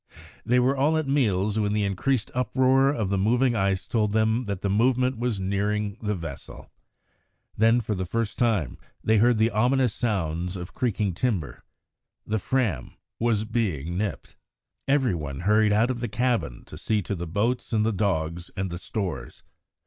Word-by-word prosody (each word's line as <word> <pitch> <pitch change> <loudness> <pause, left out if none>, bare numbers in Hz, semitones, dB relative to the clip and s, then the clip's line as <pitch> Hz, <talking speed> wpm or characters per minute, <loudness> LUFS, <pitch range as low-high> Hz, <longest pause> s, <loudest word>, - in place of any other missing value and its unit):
They 125 +3 +3
were 130 +2 +2
all 145 +4 +2
at 155 -3 -1
meals 105 -7 +1
when 105 -1 0
the 105 0 +1
increased 105 +5 0
uproar 130 +2 +3
of 110 -9 -1
the 100 - +1
moving 120 +5 +2
ice 95 -2 0
told 105 -3 0
them 110 +3 +2
that 100 -2 -4
the - - -1
movement 125 +3 +2
was 120 -4 -1
nearing 100 +1 -1
the 105 -2 -1
vessel. 80 -6 -9 0.8
Then, 115 +3 +4
for 110 -1 -2
the 95 -2 -3
first 115 +1 -2
time, 110 - +1 0.2
they 110 0 +3
heard 120 +1 +4
the 110 +2 +3
ominous 125 +1 +2
sounds 90 -5 -2
of 90 0 -8
creaking 105 -5 -1
timber. 95 - -2 0.6
The 110 +1 -1
Fram 110 - -1 0.2
was 115 -2 +1
being 90 - -2
"nipped." 100 0 -4 0.5
Every 135 -6 +2
one 75 -3 -5
hurried 105 +3 +3
out 110 +4 +3
of 120 - -4
the 120 -1 -3
cabin 115 - -1
to - - -10
see 105 -2 0
to 100 - -3
the 85 -2 -4
boats 110 +9 -1
and 110 -2 +2
the 115 - +1
dogs 85 -4 -1
and 95 -1 -2
the 85 - -5
stores. 90 - -5
105 Hz, 175 wpm, -25 LUFS, 95-120 Hz, 0.8 s, Then